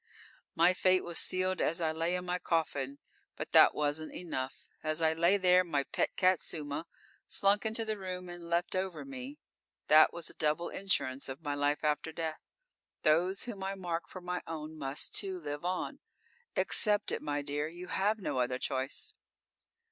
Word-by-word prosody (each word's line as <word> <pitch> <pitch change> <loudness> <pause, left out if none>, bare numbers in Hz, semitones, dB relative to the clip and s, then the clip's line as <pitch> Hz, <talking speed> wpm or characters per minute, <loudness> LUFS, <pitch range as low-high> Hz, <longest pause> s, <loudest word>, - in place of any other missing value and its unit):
My 170 +2 +5
fate 185 0 +3
was 170 -1 0
sealed 185 0 +1
as 165 - +1
I 160 -2 +1
lay 165 +3 0
in 180 0 -3
my 180 0 -1
coffin. 145 -5 -1 0.4
But - - -6
that - - +7
wasn't 150 +1 -1
enough. 135 -7 -5
As 155 +1 0
I 160 -1 +3
lay 170 +5 +4
there, 185 -1 +5
my 150 -5 0
pet - - -1
cat, 185 -1 +4
Suma, 150 +1 -5 0.4
slunk 200 +2 +3
into 225 +1 -1
the 215 -1 -2
room 185 -1 -5
and 175 -1 -9
leapt 170 +2 0
over 185 +3 -2
me. 270 +1 -7 0.5
That 155 +1 +8
was 170 -2 -5
a - - -4
double 155 +3 0
insurance 140 -9 0
of 135 +5 -7
my 145 -1 -1
life 145 +1 0
after 150 +1 0
death. 160 -1 -5 0.6
Those 175 +5 +3
whom 205 -6 -6
I 195 +1 -2
mark 175 -3 -3
for 185 - -8
my 180 0 -3
own 160 -1 -6
must, 140 -1 -1
too, 190 -2 -2
live 145 -1 -5
on. 180 +1 -2 0.6
Accept 210 -1 +3
it, - - -2
my 145 0 -2
dear. 145 +1 -2
You 175 +3 -8
have 210 +3 +1
no 185 -10 -2
other 125 0 0
choice." 135 - -3
170 Hz, 180 wpm, -32 LUFS, 150-185 Hz, 0.6 s, That